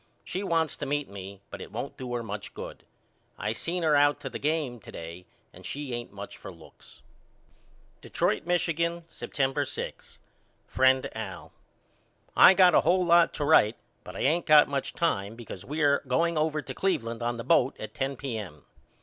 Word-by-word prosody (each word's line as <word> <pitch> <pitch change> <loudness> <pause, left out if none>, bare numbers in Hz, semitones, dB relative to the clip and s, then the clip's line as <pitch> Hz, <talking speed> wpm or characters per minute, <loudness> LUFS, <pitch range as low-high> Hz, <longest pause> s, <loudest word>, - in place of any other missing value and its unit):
She 185 - -4
wants 165 -6 0
to - - -4
meet 145 +1 -1
me 100 0 -9
but - - -7
it - - -9
won't 120 +6 -5
do 125 -2 -7
her 120 - -2
much 105 -2 -7
good. - - -8 0.5
I 105 - -2
seen 170 +9 -3
her 155 -2 +4
out 145 0 +4
to 135 - -6
the - - -5
game 150 -5 -1
to - - -12
day 85 +2 -9 0.3
and 90 - -14
she 140 +5 -5
ain't 120 0 -5
much 100 0 -9
for 95 - -9
looks. 85 -3 -17 1.0
Detroit, 160 - -1
Mich., 175 0 +2 0.4
September 135 +1 -1
6. 135 - -7 0.5
FRIEND 130 0 +3
AL: - - -7 0.8
I 190 - +8
got 180 -2 +6
a - - +6
hole 180 +2 +3
lot 170 0 +5
to 145 - -1
write 120 -7 +5 0.3
but - - -10
I - - -4
ain't 165 +5 +1
got 150 -1 +7
much 140 -1 -3
time 110 -11 -1
because 115 -6 -9
we 150 +4 -2
are 140 -1 +4
going 165 +7 +1
over 155 -1 0
to - - -6
Cleveland 115 -12 -1
on 120 0 -1
the 115 - -5
boat 135 -1 +3
at - - -7
ten 135 +1 -2
P.M. 110 - -6
135 Hz, 185 wpm, -28 LUFS, 115-160 Hz, 1.0 s, I